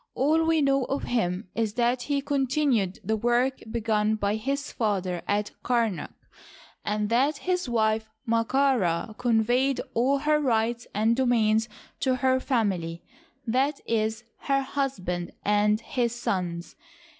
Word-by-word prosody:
All 310 +5 +3
we 325 -2 +3
know 275 -1 +2
of 275 +3 -2
him 185 -5 -1
is 225 -2 -1
that 245 +1 +1
he 280 +1 -1
continued 270 -8 +1
the 220 +3 0
work 240 +4 +1
begun 220 -1 +1
by 205 -1 0
his 275 +6 -2
father 190 -6 -1
at 205 +1 0
Kamak, 230 -6 0 0.7
and 210 0 -1
that 270 +6 +2
his 360 -5 -1
wife, 220 -1 +1 0.2
Md'ka 230 -6 +1
Rd, 215 - -15
conveyed 245 +3 +2
all 260 +4 +2
her 300 +2 +2
rights 235 -3 0
and 220 +3 +3
domains 225 -3 +2 0.3
to 260 -1 +1
her 260 0 +2
family 190 -11 -1 0.3
— 270 0 -40
i. 270 +3 +2
e., 220 -1 +1 0.3
her 275 0 +1
husband 190 -12 -3
and 210 +1 +3
his 240 -1 -1
sons. 175 -7 -3
235 Hz, 140 wpm, -26 LUFS, 210-270 Hz, 0.7 s, All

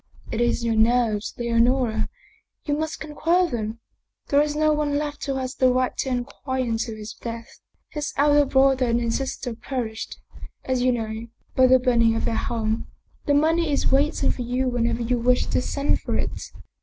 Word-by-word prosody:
'" - - -17
"It 225 - -1
is 240 0 +1
your 230 - +1
nerves, 220 -1 +2
Leonora; 235 -1 +1 0.6
you 290 - 0
must 315 +1 -3
conquer 330 +4 +1
them. 225 -1 -4 0.5
There 285 0 +5
is 295 0 -1
no 310 0 +3
one 295 -1 0
left 295 0 -4
who 275 - -1
has 260 0 -3
the 255 -2 +3
right 255 0 0
to 265 - -1
inquire 260 +1 -2
into 225 -1 -2
his 215 0 -8
death. 230 0 -8 0.3
His 295 -1 -4
elder 290 0 +5
brother 265 -1 +3
and 235 0 +2
his 230 -1 0
sister 265 -2 -4
perished, 230 -2 -5 0.5
as 260 -1 0
you 255 0 +3
know, 225 -1 -3 0.3
by 260 0 +6
the 260 0 +7
burning 235 -3 +3
of - - -1
their - - 0
home. 220 -1 -2 0.4
The 285 - +4
money 320 +2 +2
is 280 - +1
wait 285 +3 +2
ing - - +3
for - - -5
you 250 +2 0
whenever 240 -1 0
you 245 +1 0
wish 250 +1 +2
to - - 0
send 280 +2 0
for - - -2
it. - - -4
250 Hz, 195 wpm, -24 LUFS, 230-280 Hz, 0.6 s, the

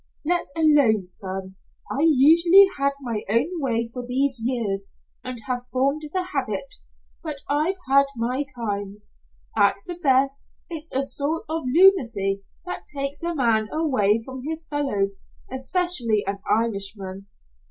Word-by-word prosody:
"Let 350 +2 0
alone, 285 - +3
son. 190 +1 -6 0.3
I've 300 +4 +2
usually 335 +7 +7
had 280 0 +2
my 230 -5 -3
own 300 - 0
way 230 -4 -1
for 250 - -5
these 260 0 +1
years 215 -6 -2 0.4
and 255 -1 -6
have 250 0 -4
formed 275 +4 0
the 370 +1 -1
habit, - - -3 0.4
but 300 -4 -5
I've 305 +6 0
had 275 +1 +4
my 245 +4 -1
times. 205 -3 -5 0.4
At 200 - +4
the 350 -1 -7
best 270 -1 +2 0.2
it's 325 0 -3
a 270 - +3
sort 290 +4 0
of 320 -2 -4
lunacy 235 - +3 0.2
that 360 - -6
takes 275 0 -3
a 340 0 -2
man 230 -5 +1
away 230 -9 +1
from 260 -1 -8
his 320 +2 -4
fellows, 205 -11 -1 0.3
especially 260 - +3
an 195 +1 -3
Irishman. 200 -3 0
260 Hz, 140 wpm, -23 LUFS, 215-310 Hz, 0.4 s, usually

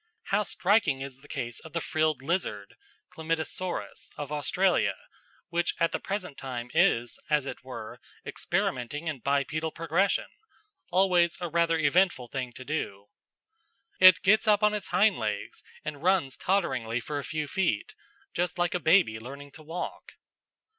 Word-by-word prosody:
How 205 +2 +3
striking 195 -8 +2
is 135 -1 -7
the 145 - -17
case 120 -4 -4
of 160 - -13
the 170 - 0
frilled 155 -4 0
lizard 135 - -2 0.4
(Chlamydosaurus) 165 +2 -3
of 145 -1 -5
Australia, 150 +6 +2 0.5
which 175 0 0
at 165 0 +2
the - - -1
present 190 -7 -4
time 125 -2 -5
is, 120 0 +2
as 150 -3 +2
it - - -7
were, 125 -4 -8 0.3
experimenting 130 +6 -2
in 155 -4 -2
bipedal 140 +4 0
progression 165 +5 +1 0.6
always 180 -2 +3
a 175 -2 -3
rather 165 0 +2
eventful 160 -4 +2
thing 130 -2 -4
to 130 - -10
do. 100 -9 -4 0.9
It 185 -1 +8
gets 215 +3 +4
up 210 0 +4
on 210 0 +5
its 210 -3 -3
hind 195 - +3
legs 110 -2 -3 0.2
and 150 -2 -5
runs 175 -7 +2
totteringly 130 - 0
for 145 +4 -4
a - - -5
few 155 0 -3
feet, 170 - -1 0.4
just 175 +1 -1
like 175 -1 +1
a 180 - 0
baby 160 - +4
learning 140 +4 -9
to 155 - -13
walk. 165 +3 -6
155 Hz, 155 wpm, -28 LUFS, 135-180 Hz, 0.9 s, It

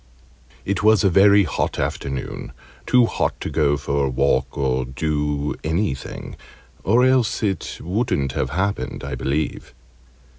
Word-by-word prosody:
It 100 0 -1
was 110 -2 +4
a 100 - +4
very 100 +2 +6
hot 80 - -2
afternoon 70 -2 -4 0.3
too 125 -1 +5
hot - - -1
to - - -4
go 75 -2 +2
for 70 0 -1
a - - 0
walk 65 0 0
or 65 -2 0
do 75 +2 -2
anything 80 -4 -3 0.5
or 120 +5 +4
else 130 -4 +2
it 100 -3 -2
wouldn't 90 - -1
have 65 - -2
happened, 95 +7 -2
I - - -5
believe. 70 0 -3
75 Hz, 140 wpm, -22 LUFS, 70-100 Hz, 0.5 s, very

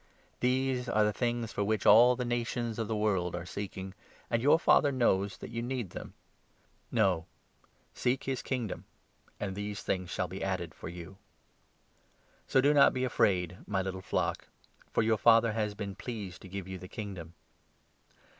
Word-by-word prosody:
These 125 0 +1
are 110 -1 +3
the 105 0 +2
30 - - -17
things 120 -2 -1
for 100 - 0
which 110 +1 0
all 120 +4 +8
the 125 0 -3
nations 120 -1 -2
of 110 - -1
the 110 - -1
world 95 -5 0
are 90 0 -5
seeking, 95 0 -6 0.4
and 115 -1 +2
your 145 +5 +6
Father 145 -3 +4
knows 100 -6 +1
that - - -9
you 115 0 -3
need 120 -6 -3
them. - - -8 0.8
No, 80 +2 +2 0.7
seek 125 +2 0
his 135 -2 -2
Kingdom, 120 -6 -3 0.5
31 105 - -3
and 95 - -5
these 105 0 -4
things 90 -2 -2
shall - - -1
be - - -6
added - - -2
for - - -8
you. 90 +2 -9 1.3
So 130 - +4
do 145 +2 +4
not 145 - +6
be 130 - 0
afraid, 90 -8 +2
32 90 +3 -14
my 95 -1 +1
little 95 -1 -4
flock, - - -1 0.4
for - - +2
your 110 -1 +2
Father 115 +1 +5
has 105 -2 -1
been 100 -2 -5
pleased 100 -7 -6
to 95 - -11
give 95 0 -5
you 95 -1 -6
the 90 - -9
Kingdom. 90 -6 -7
105 Hz, 185 wpm, -31 LUFS, 95-120 Hz, 1.3 s, all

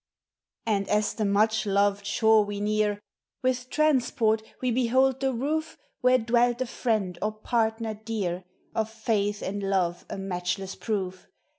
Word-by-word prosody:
Ami 200 -3 0
as 210 0 +2
the 215 - -1
much 215 +2 +2
loved 200 0 +2
shore 220 +1 +4
we 205 0 -5
near, 210 0 +1 0.4
With 255 0 0
transport 245 -7 +2 0.2
we 255 -1 0
behold 260 +2 +2
the 270 -1 +1
roof 305 +6 -2 0.2
Where 255 0 +5
dwelt 240 +1 +2
a - - +1
friend 215 -7 -1
or 215 0 0
partner 225 0 -1
dear, 210 -5 -3 0.3
(M' 220 - +1
faith 215 -2 -1
and 200 +1 -3
love 185 -3 0
a - - -5
matchless 190 0 -3
proof. 185 -4 -4
215 Hz, 145 wpm, -27 LUFS, 200-240 Hz, 0.4 s, Where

